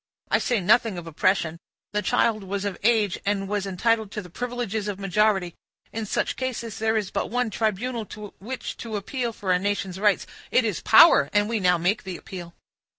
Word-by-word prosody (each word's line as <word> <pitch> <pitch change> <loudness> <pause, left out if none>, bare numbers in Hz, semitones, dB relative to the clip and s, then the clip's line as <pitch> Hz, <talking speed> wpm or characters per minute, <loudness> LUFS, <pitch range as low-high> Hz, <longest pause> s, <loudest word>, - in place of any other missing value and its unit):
I - - +4
say 240 -3 +1
nothing 215 +1 +3
of 175 - -6
oppression; 165 0 0 0.3
the 210 - +1
child 220 0 +1
was 195 +1 -3
of 200 -2 -2
age, 215 -4 +2
and 200 -1 -1
was 205 0 -2
entitled 220 +3 +1
to 210 - -4
the 180 - -13
privileges 235 -2 -3
of 200 -2 -4
majority. 195 -2 +1 0.4
In 225 -1 -3
such - - -1
cases, 240 -3 -4
there 220 0 +1
is 205 -3 -2
but - - -2
one 245 0 0
tribunal 220 +2 -1
to 210 -1 -9
which 245 +7 -6
to 225 -2 -6
appeal 235 +4 -2
for 200 -4 -3
a 180 - +3
nation's 195 -1 -2
rights—it 210 +4 +1
is 210 -5 -2
power, 330 +10 +7
and 205 0 +3
we 225 -1 -1
now 180 -2 +3
make 180 +6 +1
the 185 -2 -6
appeal." 175 -2 -9
210 Hz, 195 wpm, -25 LUFS, 190-225 Hz, 0.4 s, power